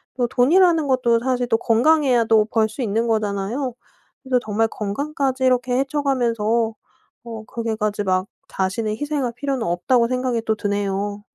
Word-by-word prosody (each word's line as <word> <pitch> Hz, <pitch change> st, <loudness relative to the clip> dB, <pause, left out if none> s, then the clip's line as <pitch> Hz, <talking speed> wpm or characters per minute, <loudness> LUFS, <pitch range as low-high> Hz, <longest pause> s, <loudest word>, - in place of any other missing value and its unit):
또 245 Hz, -2 st, 0 dB
돈이라는 330 Hz, +3 st, +3 dB
것도 250 Hz, -3 st, +2 dB
사실 250 Hz, 0 st, -1 dB
또 225 Hz, -, +3 dB
건강해야 250 Hz, +1 st, +3 dB
또 220 Hz, -1 st, +4 dB
벌 220 Hz, 0 st, +1 dB
수 255 Hz, -, -7 dB
있는 225 Hz, +1 st, 0 dB
거잖아요. 215 Hz, +4 st, -1 dB, 0.5 s
그래서 255 Hz, -1 st, +1 dB
정말 220 Hz, +1 st, +1 dB
건강까지 265 Hz, +5 st, -2 dB
이렇게 250 Hz, 0 st, +2 dB
해쳐가면서 265 Hz, -6 st, 0 dB, 0.8 s
어 225 Hz, -2 st, -8 dB
그렇게까지 215 Hz, -3 st, -2 dB
막 185 Hz, +1 st, 0 dB, 0.2 s
자신의 210 Hz, +3 st, -2 dB
희생할 290 Hz, -5 st, -2 dB
필요는 270 Hz, -4 st, -2 dB
없다고 235 Hz, +8 st, +2 dB
생각이 250 Hz, -2 st, -1 dB
또 220 Hz, -, +1 dB
드네요. 205 Hz, 0 st, -2 dB
235 Hz, 350 characters per minute, -21 LUFS, 215-260 Hz, 0.8 s, 또